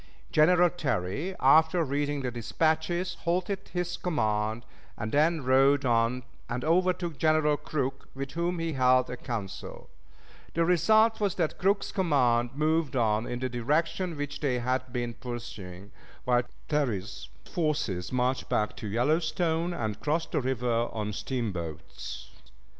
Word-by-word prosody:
General 175 +3 +5
Terry, 145 - -2
after 160 +5 +5
reading 145 0 -1
the 125 - -2
dispatches, 160 - 0
halted 185 +3 -1
his 175 0 -2
command, 110 -8 -1 0.3
and 110 +1 -4
then 155 +2 +2
rode 135 +2 +4
on 120 +1 +2 0.3
and 125 +3 -3
overtook 175 -1 +1
General 155 -1 +3
Crook, 135 -2 -3
with 135 0 -5
whom 170 +2 -1
he 165 -1 -2
held 130 -1 +3
a - - -3
council; 115 -6 -6 0.6
the 165 0 +3
result 220 +6 +4
was 200 -3 0
that 165 -4 -1
Crook's 200 +2 +1
command 125 - +2
moved 155 -2 +1
on 110 -2 +1
in 120 - -3
the 130 +1 -2
direction 155 +8 -1
which 145 0 -4
they 135 -4 0
had 130 +1 -1
been 120 -1 -2
pursuing, 105 -6 -8 0.3
while 125 -1 +3 0.3
Terry's 110 -10 -2 0.2
forces 150 - -1
marched 125 +1 0
back 105 - 0
to 110 - -5
the 100 - -4
Yellowstone 160 +5 +1
and 110 -10 -3
crossed 160 +2 -1
the - - +1
river 120 -2 0
on 105 -1 -3
steamboats. 100 - -5
140 Hz, 140 wpm, -28 LUFS, 120-165 Hz, 0.6 s, General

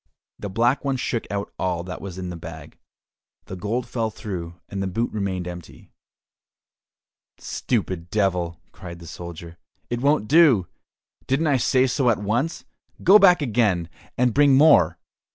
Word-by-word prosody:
The 105 - -5
Black 120 +7 +1
One 135 -2 -1
shook 120 -2 -3
out 100 0 -4
all 90 -2 -1
that 90 0 -7
was 95 -2 -7
in 90 -1 -5
the - - -6
bag; 80 -2 -10 0.7
the 95 - -7
gold 110 +7 -3
fell 115 -2 -2
through, 90 -5 -6
and 100 -1 -5
the 95 - -1
boot 115 +6 -2
remained 95 -4 -3
empty. 85 -2 -10 1.5
"Stupid 95 -7 -3
Devil," 90 -4 0
cried 85 -2 -10
the 85 - -12
soldier, 85 0 -9 0.3
"it 120 0 -2
won't 140 -5 +2
do! 140 - +5 0.6
Didn't 140 +5 +1
I 145 -3 +3
say 130 +1 +2
so 130 0 +1
at 115 - +2
once? 115 +11 -2 0.4
Go 200 +4 +8
back 180 -5 +5
again, 105 - +1 0.3
and 125 -1 +2
bring 145 -1 +5
more." 150 +3 +5
105 Hz, 155 wpm, -23 LUFS, 90-130 Hz, 1.5 s, Go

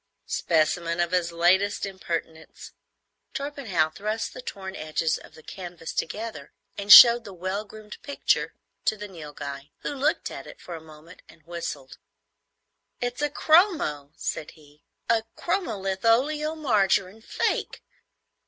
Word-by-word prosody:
"Specimen 170 +1 +1
of 175 0 +1
his 175 -2 +1
latest 185 +5 +2
impertinence." 165 -4 -6 0.6
Torpenhow 255 - -1
thrust 215 +4 -3
the 255 - -8
torn 190 -5 -7
edges 155 +1 -1
of - - -16
the 155 - -15
canvas 175 -3 -8
together 215 -7 -4 0.2
and 200 +1 -1
showed 235 +1 +11
the 200 -3 -10
well 190 +4 -3
groomed 215 0 -11
picture 285 - 0 0.3
to 215 - +2
the 210 0 -7
Nilghai, 145 -5 -8
who - - -3
looked 285 +3 0
at - - -8
it - - -12
for 175 - -9
a 165 - -7
moment 160 +2 -15
and 160 - -18
whistled. 150 -6 -6 1.0
"It's 245 +2 -3
a 295 - +1
chromo," 310 - +3
said 150 - -3
he,—"a 155 +9 -4
chromo 345 - -1
litholeomargarine 225 -1 +1
fake! - - -2
190 Hz, 130 wpm, -26 LUFS, 165-230 Hz, 1.0 s, showed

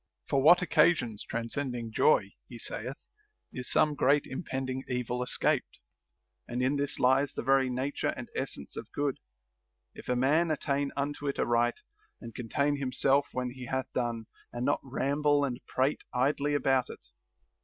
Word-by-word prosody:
For 135 - +2
what 175 +5 +7
occasions 120 - +2
transcending 115 0 -3
joy 100 -2 +3 0.2
(he 120 - -8
saith) 125 +3 -5 0.6
is 125 - -5
some 150 - +3
great 145 +1 +3
impending 130 -2 -4
evil 125 -1 -2
escaped; 125 - 0 0.7
and 125 +1 -2
in 135 +3 +2
this 140 0 -1
lies 130 +2 +3
the - - -4
very 135 0 +3
nature 130 +3 -1
and - - -6
essence - - -4
of - - -8
good, 145 -2 -1 0.7
if - - -11
a 125 - +2
man 150 +7 +3
attain 140 -2 0
unto 145 +1 -2
it 140 - -1
aright, 120 0 +1 0.4
and 115 -2 -9
contain 140 +5 0
himself 135 +1 +2
when 125 -1 -2
he 125 -1 -8
hath 130 +1 -3
done, 120 -2 -2 0.3
and 120 +1 -3
not 145 - +2
ramble 145 +2 +1
and 125 -2 -4
prate 135 +3 0
idly 140 +3 +1
about 135 -2 +2
it. - - -10
130 Hz, 155 wpm, -30 LUFS, 125-145 Hz, 0.7 s, what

